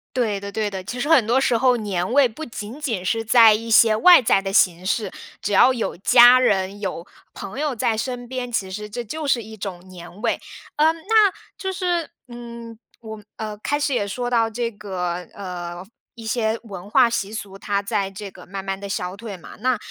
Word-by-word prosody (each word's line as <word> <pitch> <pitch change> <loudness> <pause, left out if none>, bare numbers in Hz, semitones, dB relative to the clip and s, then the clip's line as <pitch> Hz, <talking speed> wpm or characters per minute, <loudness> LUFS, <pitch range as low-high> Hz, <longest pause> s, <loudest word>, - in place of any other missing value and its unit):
对 220 -6 0
的， 200 0 -7
对 215 0 -1
的。 190 -2 -6
其 245 +6 -6
实 285 - -2
很 270 -10 +5
多 245 +3 +3
时 250 -3 +2
候 250 +1 +3
年 195 -2 -2
味 280 -1 +5
不 240 +7 -9
仅 225 +1 -8
仅 225 -11 -3
是 225 +4 0
在 225 -1 +7
一 225 +2 -3
些 220 0 +6
外 350 +8 +7
在 220 -4 +3
的 195 0 -4
形 180 -2 +3
式。 210 0 -1 0.3
只 205 - -3
要 205 +6 +6
有 230 - -3
家 245 +5 +7
人、 200 -5 +1
有 190 -4 -4 0.3
朋 200 +7 -7
友 295 -3 -1
在 225 0 0
身 245 +1 -4
边 250 -1 -5
其 195 -5 -2
实 210 +2 -6
这 240 +3 -5
就 300 +7 -5
是 245 -4 +1
一 220 +1 -10
种 190 -3 -7
年 180 +2 -12
味。 235 - 0 0.4
呃， 310 +2 +5
那， 405 +5 +3 0.3
就 380 - -3
是， 355 -3 -1 0.2
嗯 235 -1 -10 0.2
我 220 -2 -9
呃， 215 -1 -5
开 290 +6 -1
始 285 -1 0
也 205 - 0
说 245 +5 -3
到 230 -2 +2
这 235 +1 -2
个， 190 -5 -4 0.2
呃 180 -2 -7 0.3
一 230 -2 -10
些 225 -1 0
文 200 -3 -9
化 235 - +5
习 215 -3 -2
俗， 200 -3 -7
它 200 0 -1
在 200 -1 -2
这 200 +1 -8
个 - - -14
慢 195 0 -7
慢 195 0 -2
地 200 0 -8
消 180 -1 -3
退 200 -2 -8
嘛。 170 - -13
那， 255 -1 +1
220 Hz, 230 characters per minute, -22 LUFS, 195-245 Hz, 0.4 s, 在